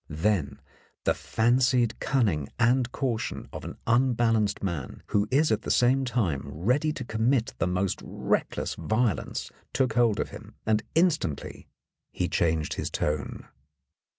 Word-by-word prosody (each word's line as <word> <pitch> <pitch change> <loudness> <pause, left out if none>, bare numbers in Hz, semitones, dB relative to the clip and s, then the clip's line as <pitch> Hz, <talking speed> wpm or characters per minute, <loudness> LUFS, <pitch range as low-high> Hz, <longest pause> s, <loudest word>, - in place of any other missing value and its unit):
Then 80 -3 0 0.4
the - - +3
fancied 120 0 +2
cunning 100 - +1
and 125 +2 +3
caution 125 -6 -2
of - - -6
an - - -7
unbalanced 115 -4 +2
man 85 -9 -4
who 105 0 +2
is 145 +2 +3
at 110 0 +1
the - - -6
same 130 +2 +3
time 100 - 0
ready 125 - +1
to 130 -4 -5
commit 115 +2 +1
the 80 - +1
most 90 +1 -1
reckless - - -1
violence 110 -3 -1 0.2
took 130 -4 +1
hold 115 -3 +3
of - - -1
him, - - -11
and 110 -1 +2
instantly 160 - 0 0.4
he 90 - -1
changed 80 -3 0
his - - -3
tone. 75 0 -3
115 Hz, 140 wpm, -27 LUFS, 90-125 Hz, 0.4 s, the